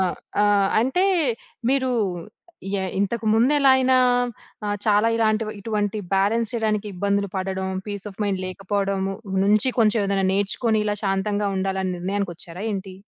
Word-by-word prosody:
ఆ! 180 - -1 0.3
ఆహ్, 200 -1 +3
అంటే 265 +11 +1 0.7
మీరూ 260 -1 +2 0.8
యాహ్! 190 -1 -1
ఇంతకు 220 +3 -1
ముందెలయినా 260 +1 +4 0.7
ఆహ్, 205 - -1
చాలా 210 +2 +4
ఇలాంటి, 220 0 +2 0.2
ఇటువంటి 210 -1 -2 0.2
బ్యాలన్స్ 215 +4 +1
చేయడానికి 215 -2 0
ఇబ్బందులు 200 +1 0
పడడం, 190 0 -2 0.2
పీస్ 205 0 -5
ఆఫ్ 190 - -15
మైండ్ 190 -2 -1
లేకపోడము 195 0 -2 0.3
నుంచి 210 +5 +3
కొంచెం 215 0 +3
ఏదైనా 195 -1 +1
నేర్చుకొని 210 +3 +1
ఇలా 205 - 0
శాంతంగా 200 +1 0
ఉండాలని 190 -1 -1
నిర్ణయానికొచ్చారా 180 -1 -4
ఏంటి? 190 -1 -5
205 Hz, 130 wpm, -23 LUFS, 195-220 Hz, 0.8 s, ముందెలయినా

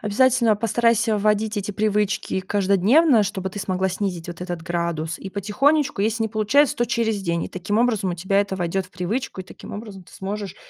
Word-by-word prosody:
Обязательно 230 +1 +3
постарайся 230 +1 +2
вводить 210 +1 +1
эти 205 0 -2
привычки 210 -2 0
каждодневно, 205 - +3
чтобы 190 -1 -3
ты 205 - -6
смогла 190 0 0
снизить 185 -3 -3
вот 175 0 -7
этот 175 -2 -4
градус. 170 -2 -2
И 195 - -8
потихонечку, 260 +6 +1
если 225 +1 0
не - - -1
получается, 235 +7 +3
то 240 -2 +1
через 225 -4 0
день. 170 -2 -1
И - - -6
таким 205 +4 -2
образом 225 -6 +1
у - - -2
тебя 190 +3 +1
это 195 -1 -2
войдет 180 +1 -2
в - - -25
привычку. 190 +5 -3
И - - -7
таким - - -11
образом 205 -3 -8
ты - - -20
сможешь, 200 -1 -5
205 Hz, 195 wpm, -22 LUFS, 185-225 Hz, -, Обязательно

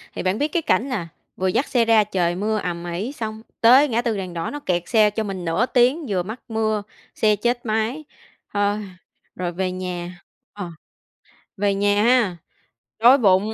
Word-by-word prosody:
thì - - -4
bạn 185 +3 0
biết 295 - +1
cái 330 +2 -1
cảnh 270 -2 +1
nà 185 -10 -3 0.3
vừa 190 - -1
dắt 255 +10 +1
xe 240 -3 +2
ra 225 -2 +5
trời 175 -4 -1
mưa 215 +3 -1
ầm 175 -1 -4
ĩ, 205 +10 -3
xong 220 -5 -6 0.2
tới 260 +6 +7
ngã 235 -2 0
tư 230 -3 -1
đèn 185 -2 -5
đỏ 165 -1 -3
nó 290 - -5
kẹt 175 -10 -1
xe 215 -3 +5
cho 215 +1 -3
mình 190 -3 -5
nửa 165 +8 +1
tiếng, 255 +6 +2
vừa 185 -3 0
mắc 220 +6 -7
mưa, 220 -2 0 0.3
xe 215 -1 +3
chết 240 +4 -1
máy, 225 +7 -1 0.5
thôi. 205 0 +1 0.6
Rồi 180 -1 -3
về 185 +1 -2
nhà 180 -1 -5 0.3
ờ, 190 -4 -6 0.9
về 200 0 +1
nhà 205 +1 +2
ha, 230 -7 +3 0.6
đói 245 +4 +7
bụng. 205 -2 +3
210 Hz, 190 wpm, -22 LUFS, 185-235 Hz, 0.9 s, tới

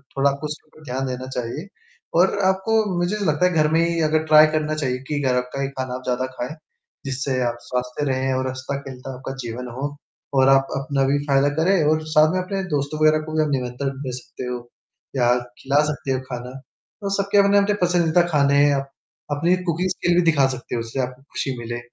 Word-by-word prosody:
थोड़ा 140 +1 +3
आपको 140 +2 -4
उसके 150 +1 -8
ऊपर 155 0 -19
ध्यान 130 +1 -2
देना 130 0 -4
चाहिए 130 - -4 0.5
और 190 +3 +4
आपको, 210 +4 +2
मुझे 175 +4 0
नहीं 205 - -2
लगता 155 +4 +2
है 180 - +3
घर 155 -1 +3
में 165 - +3
ही 170 -1 +1
अगर 155 +1 +2
ट्राई 155 0 +8
करना 155 0 0
चाहिए 135 -4 -1
कि 145 -1 -1
अ, - - +1
घर 125 - +3
का 140 - -2
ही 135 - 0
खाना 130 -1 -3
आप 130 - -7
ज़्यादा 125 0 0
खाएँ, 130 +6 -4 0.5
जिससे 135 -1 -1
आप 120 0 -3
स्वस्थ 125 +2 -3
रहें 130 0 0
और 130 0 -1
हँसता-खेलता 130 0 -6
आपका 135 +1 -6
जीवन 120 +2 -5
हो 145 +2 -2 0.5
और 130 +1 +5
आप 135 0 +5
अपना 135 -1 0
भी 145 - +3
फ़ायदा 140 +1 +4
करें 185 -1 +3
और 155 0 +1
साथ 155 0 +6
में 185 - +1
अपने 195 +1 -3
दोस्तों 145 +2 -2
वगैरह 155 0 +5
को 155 - -7
भी 155 - +4
आप 150 - -1
निमंत्रण 130 +1 -1 0.2
भेज 125 -1 -3
सकते 130 - -8
हो 125 0 -3 0.6
या 120 -1 +3 0.3
खिला 140 +2 +2
सकते 140 -2 -4
हो 130 - +1
खाना। 125 0 -5 0.5
तो 200 - -2
सबके 200 +1 +1
अपने-अपने 200 +1 +4
पसंदीदा 175 -1 +3
खाने 140 -1 +4
हैं, 145 - +4
अप 135 0 -3 0.4
अपनी 170 +5 +2
कुकिंग 180 +3 0
स्किल 175 -1 +1
भी 180 - +5
दिखा 140 -3 +3
सकते 125 - -6
हो, 115 - -1
उससे 115 +4 -5
आपको 125 +1 -5
खुशी 130 -3 -3
मिले। 120 +1 -5
140 Hz, 220 wpm, -22 LUFS, 130-160 Hz, 0.6 s, ट्राई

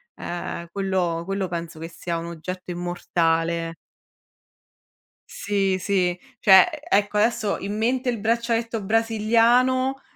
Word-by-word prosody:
ehm, 170 0 -5
quello 185 -4 -1
quello 195 0 -2
penso 170 -1 -5
che 165 +1 -6
sia 170 0 -4
un 165 - -5
oggetto 180 +2 -6
immortale. 170 -1 -1 1.5
Sì, 195 -2 0
sì. 180 -2 0 0.2
Cioè, 190 - +7 0.2
ecco, 205 +1 +2
adesso 220 -1 +1
in 205 +2 -4
mente 250 +3 0
il 235 - -2
braccialetto 230 0 -1
brasiliano 230 +5 +2
195 Hz, 110 wpm, -23 LUFS, 175-225 Hz, 1.5 s, Cioè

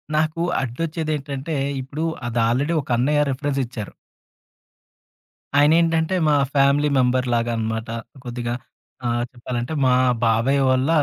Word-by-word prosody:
నాకు 155 +2 +1 0.2
అడ్డొచ్చేదేంటంటే, 150 +1 -3 0.3
ఇప్పుడు 145 +5 -4 0.2
అదాల్రెడీ 120 +7 +1
ఒక 140 - -16
అన్నయ్య 145 +4 +2
రిఫరెన్స్ 140 +1 -1
ఇచ్చారు... 115 -4 -7 1.6
ఆయనేంటంటే, 165 +3 +3
మా 150 - +4 0.2
ఫ్యామిలీ 140 +2 +4
మెంబర్ 125 0 +2
లాగన్నమాట. 115 -1 -1 0.4
కొద్దిగా 120 0 -3 0.5
ఆహ్, 120 0 0
చెప్పాలంటే, 120 +2 -4
మా 125 - +4 0.3
బాబాయ్ 115 +5 +2
ఓళ్ళ 130 +3 +1
135 Hz, 105 wpm, -22 LUFS, 120-150 Hz, 1.6 s, మా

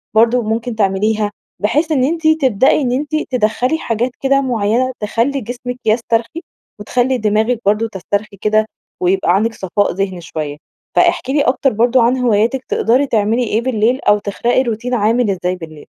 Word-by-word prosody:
برضو 235 +3 +4
ممكن 225 +2 -3
تعمليها، 210 +1 0 0.3
بحيث 300 +10 0
إن 270 -4 +2
أنتِ 320 +3 0
تبدئي 270 -4 +3
إن 250 - 0
أنتِ 295 +4 -2
تدّخلي 250 +4 0
حاجات 240 -3 -2
كده 275 0 +2
معيّنة 245 0 0
تخلي 230 +6 -1
جسمِك 245 +2 -6
يسترخي 230 +6 0 0.4
وتخلي 250 +5 0
دماغِك 220 +2 +1
برضو 210 +3 +2
تسترخي 205 0 -4
كده، 215 0 +2 0.4
ويبقى 180 0 +2
عندك 225 +4 +1
صفاء 200 0 -1
ذهني 190 -1 -3
شويّة. 155 -3 -5 0.4
فاحكي 265 - +2
لي 290 - +3
أكتر 270 -1 +1
برضو 240 +3 +3
عن 240 +3 +2
هواياتك، 240 +1 +1
تقدري 255 +5 +2
تعملي 225 +1 +1
إيه 225 0 0
بالليل 245 +1 0
أو 205 - +4
تخلقي 235 +5 0
روتين 240 +1 -3
عامل 230 +1 +2
إزاي 180 -1 -2
بالليل؟ 155 -4 -11
230 Hz, 160 wpm, -16 LUFS, 210-255 Hz, 0.4 s, برضو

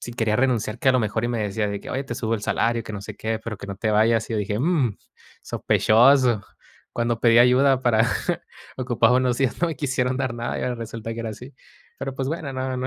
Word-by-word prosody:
si 120 - -7
quería 110 -2 0
renunciar", 120 -3 0
que 130 - +3
a - - +2
lo 130 - +2
mejor, 110 +1 -1
y - - 0
me 120 -1 -2
decía, 105 +1 -1
de 100 0 -4
que: - - -10
"Oye, 135 +1 -2
te 125 - -5
subo 115 -2 -1
el 105 - -5
salario 115 +2 0
y 115 - -10
que - - -7
no 105 - -5
sé 105 0 -8
qué, 110 +1 -2
pero 110 -1 -6
que - - -8
no 100 - -5
te 110 - -1
vayas". 110 +1 +2
Y 115 - -1
yo - - 0
dije: 105 +1 -2
"Mm, 140 - +1 0.5
sospechoso". 120 -1 +3 0.5
Cuando 120 -1 -1
pedí 115 -1 +5
ayuda, 130 +2 +5
para 115 -2 +3 0.7
ocupar 125 -2 +2
unos 125 -1 +2
días, 135 +1 0
no 170 - +3
quisieron 130 -3 -1
dar 130 -3 -2
nada, 120 0 -3
y - - -4
ahora 125 - -1
resulta 115 0 -6
que 115 - -5
ahora 115 - -4
así. 125 +5 -11 0.4
Pero, 135 - -4
pues 135 0 -3
bueno, 155 -3 -4
no 130 0 -3
no 130 +1 -2
120 Hz, 250 wpm, -23 LUFS, 110-130 Hz, 0.7 s, pedí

